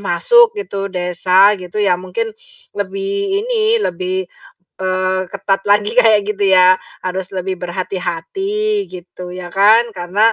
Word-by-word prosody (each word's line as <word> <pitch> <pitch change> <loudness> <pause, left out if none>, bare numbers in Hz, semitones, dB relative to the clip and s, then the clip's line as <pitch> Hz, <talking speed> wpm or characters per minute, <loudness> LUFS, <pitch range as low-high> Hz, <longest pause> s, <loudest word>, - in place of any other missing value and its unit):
masuk 455 - +4
gitu, 200 - -4
desa 185 +2 +3
gitu, 180 +3 -9
ya 190 -3 +3
mungkin 430 - -4 0.4
lebih 395 0 -4 0.3
ini, 455 -2 +1
lebih, 185 +1 -2 0.6
eee 185 0 0
ketat 195 0 -1
lagi 210 +1 +3
kayak 220 -3 +5
gitu 205 -1 -2
yah. 185 0 +5 0.2
Harus 185 0 -3
lebih 185 0 -3
berhati-hati 385 - -3
gitu, 180 0 -9
ya 180 -1 -7
kan. 220 +4 +4
Karena, 195 +6 +2
195 Hz, 130 wpm, -17 LUFS, 185-230 Hz, 0.6 s, kayak